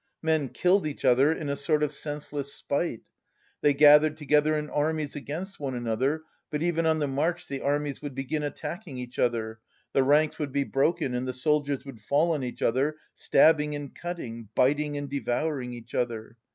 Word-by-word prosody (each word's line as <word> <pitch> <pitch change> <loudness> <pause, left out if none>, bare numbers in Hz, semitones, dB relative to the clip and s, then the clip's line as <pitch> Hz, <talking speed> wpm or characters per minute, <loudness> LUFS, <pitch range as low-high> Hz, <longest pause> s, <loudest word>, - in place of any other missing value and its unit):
Men 160 -4 +1
killed 180 +2 +2
each 145 -2 -6
other 130 +4 +5
in 160 -2 -3
a 140 - -1
sort 150 +1 +1
of 150 0 0
senseless 145 -1 -5
spite. 140 -5 -2 0.6
They 145 -1 +4
gathered 150 +1 +7
together 150 +1 +2
in 150 0 -3
armies 150 0 -1
against 165 +7 -6
one 135 -3 -3
another, 125 +6 -1 0.3
but 150 +1 -2
even 165 -1 +1
on 160 0 +3
the 150 - 0
march 145 +6 -1
the 135 -1 -4
armies 145 0 -1
would 145 -3 -6
begin 135 +3 -2
attacking 150 +1 -5
each 125 -1 -7
other, 110 -2 0 0.3
the 135 - +4
ranks 150 +4 +3
would 145 -3 -2
be 140 +1 +1
broken 140 +1 0
and 125 +1 -2
the 130 - -2
soldiers 140 +1 0
would 130 -6 -10
fall 150 +10 +2
on 150 -4 -1
each 125 - -5
other, 135 +6 +1 0.2
stabbing 150 -2 +4
and 145 -2 -7
cutting, 115 - -6
biting 145 +2 +2
and 145 0 -4
devouring 140 -1 -2
each 120 -1 -10
other. 115 -2 -2
145 Hz, 185 wpm, -27 LUFS, 130-155 Hz, 0.6 s, gathered